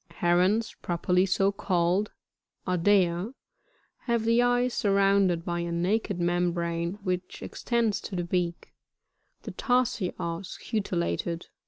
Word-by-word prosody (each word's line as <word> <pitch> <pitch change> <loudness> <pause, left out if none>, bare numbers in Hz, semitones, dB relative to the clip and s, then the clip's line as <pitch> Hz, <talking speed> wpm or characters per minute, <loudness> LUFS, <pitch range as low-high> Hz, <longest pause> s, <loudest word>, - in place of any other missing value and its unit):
35. - - -18
Herons 185 +6 +2
properly 180 +1 +1
so 195 +1 +2
called, 185 +1 0 0.3
— - - -32
Ardea, 185 +3 +2 0.3
— - - -40
have 235 -2 +1
the 230 +1 +4
eyes 245 0 +2
sur 200 -2 +1
rounded 195 -3 +3
by 175 -1 -2
a 170 0 -3
naked 185 +3 0
membrane, 170 -1 0
which 180 -1 -3
extends 235 -4 -1
to 195 - -6
the 175 - -1
beak; 175 -1 -2 0.7
the - - -6
tarsi 245 -7 0
are 170 0 -3
scutellated, 180 -3 -3
&. - - -23
185 Hz, 140 wpm, -27 LUFS, 175-210 Hz, 0.7 s, the